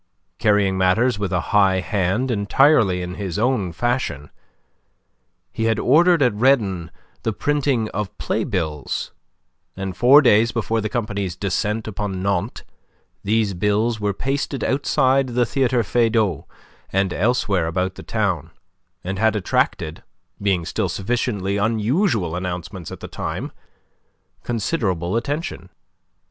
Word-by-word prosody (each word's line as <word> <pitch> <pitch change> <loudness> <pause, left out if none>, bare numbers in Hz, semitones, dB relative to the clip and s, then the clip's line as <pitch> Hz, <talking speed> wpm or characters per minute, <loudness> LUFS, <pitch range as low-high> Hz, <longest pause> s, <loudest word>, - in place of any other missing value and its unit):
Carrying 100 -3 +2
matters 100 +5 +2
with 100 -2 -2
a 90 - +1
high 95 -2 +4
hand 100 +7 0
entirely 100 -3 +3
in 90 0 -5
his 95 -2 -3
own 110 -5 +1
fashion, 120 - -2 1.2
he 115 - -2
had 115 -1 +2
ordered 165 +3 +4
at 125 -4 +3
Redon 105 -8 +2 0.3
the 115 - -1
printing 140 -2 0
of 105 -1 -5
playbills, 75 -5 -2 0.7
and 95 -1 -4
four 140 +5 +7
days 115 -1 +4
before 115 -1 -1
the 110 - -2
company's 100 -6 -3
descent 105 +4 -2
upon 100 -3 -4
Nantes, 100 +3 -1 0.6
these 105 -1 +1
bills 105 +5 0
were 105 -1 0
pasted 135 +5 -2
outside 135 -1 +2
the 120 0 +1
Theatre 130 -1 +1
Feydau 110 - +1 0.4
and 95 -1 +1
elsewhere 100 -6 +1
about 90 +2 -1
the - - -10
town, - - -1 0.5
and 95 +1 -4
had 110 0 +3
attracted 80 -5 -1 0.4
being 95 -4 +1
still - - -1
sufficiently 100 -2 -1
unusual 110 - +1
announcements 90 0 -5
at - - -9
the - - -6
time - - -5 0.9
considerable 105 - -1
attention. 140 - -3
105 Hz, 125 wpm, -21 LUFS, 95-120 Hz, 1.2 s, four